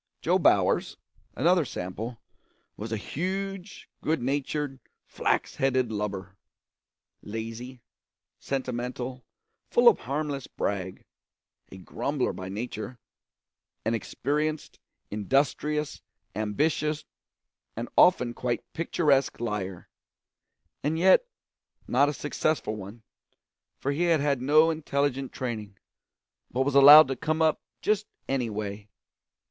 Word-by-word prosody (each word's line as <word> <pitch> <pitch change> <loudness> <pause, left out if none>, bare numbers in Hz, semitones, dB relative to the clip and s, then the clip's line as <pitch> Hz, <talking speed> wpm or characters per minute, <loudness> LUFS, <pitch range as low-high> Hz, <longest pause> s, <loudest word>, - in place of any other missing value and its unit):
Jo - - +3
Bowers, - - +3 0.4
another 175 0 +3
sample, 110 +1 -5 0.6
was 110 +2 -6
a 110 - 0
huge, 190 - -4
good 160 -1 0
natured, 140 +1 -2 0.3
flax - - -1
headed 130 -3 +1
lubber; 100 -3 -4 0.8
lazy, 115 +3 -7 0.6
sentimental, 125 -1 -4 0.5
full 240 0 +4
of 235 - +7
harmless 140 0 -3
brag, 95 -2 -3 0.7
a 95 - -9
grumbler 125 +8 -2
by 95 0 -7
nature; 110 +3 -5 0.9
an 115 - +1
experienced, 150 +6 -2 0.3
industrious, 140 +7 0 0.3
ambitious, 150 +8 0 0.7
and 115 +2 -4
often 125 -10 +5
quite 120 -1 -2
picturesque 150 -5 +1
liar, 105 -6 -4 0.9
and 155 +3 0
yet 190 - +5 0.6
not 140 +4 +3
a - - -2
successful 145 -5 -1
one, 105 +3 -9 0.7
for 140 - -2
he 160 +5 0
had 165 -2 +3
had 140 -3 +1
no 155 +5 +5
intelligent 140 -4 -1
training, 110 -6 -5 0.7
but 130 - -1
was 145 - 0
allowed 145 +2 +10
to 135 - -2
come 155 +5 -1
up 160 -1 +2 0.2
just 210 0 +1 0.2
any 130 -4 0
way. 105 -1 -5
130 Hz, 110 wpm, -27 LUFS, 110-150 Hz, 0.9 s, allowed